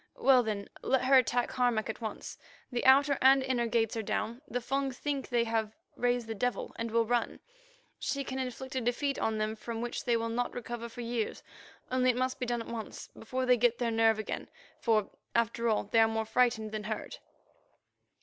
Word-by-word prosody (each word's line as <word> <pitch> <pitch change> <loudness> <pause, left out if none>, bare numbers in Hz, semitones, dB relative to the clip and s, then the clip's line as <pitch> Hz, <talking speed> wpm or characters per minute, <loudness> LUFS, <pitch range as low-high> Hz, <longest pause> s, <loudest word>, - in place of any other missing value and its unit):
Well, 265 -2 +6
then, 210 -3 -3
let 265 -1 +1
her 270 +1 +5
attack 245 0 0
Harmac 245 -4 +1
at 220 +1 -5
once. 220 -2 -6 0.3
The 245 - -1
outer 280 +1 +6
and 265 +1 +6
inner 250 -3 0
gates 225 -1 +1
are 225 - -1
down; 220 +3 -2
the 245 - -2
Fung 270 +3 -1
think 275 +1 -3
they 240 -1 +2
have 225 -2 -1 0.2
raised 245 -1 +1
the 225 - -4
devil 245 +3 -2
and 230 0 -3
will 230 +1 +2
run. 240 +1 0 0.6
She 275 0 -2
can 265 0 -4
inflict 260 +1 -5
a 260 - -1
defeat 260 +4 0
on 220 -1 0
them 215 0 -1
from 225 +1 -5
which 240 +1 -4
they 235 -1 +3
will 230 0 -2
not 240 +2 -2
recover 235 -1 -5
for 240 - -8
years, 235 -2 -3 0.5
only 255 0 +3
it 245 - +2
must 255 0 -1
be 250 - -2
done 240 -1 -1
at - - -14
once, 225 -2 -6
before 255 +3 -4
they 250 -1 +5
get 240 0 +3
their 235 -1 0
nerve 225 -1 +4
again, 215 - -4 0.3
for, 215 -4 +1 0.2
after 235 0 +1
all, 215 - +2
they 220 +3 +2
are 225 - +6
more 220 0 -1
frightened 220 -2 +1
than 215 -1 -4
hurt." 220 0 -5
235 Hz, 205 wpm, -31 LUFS, 225-255 Hz, 0.6 s, Well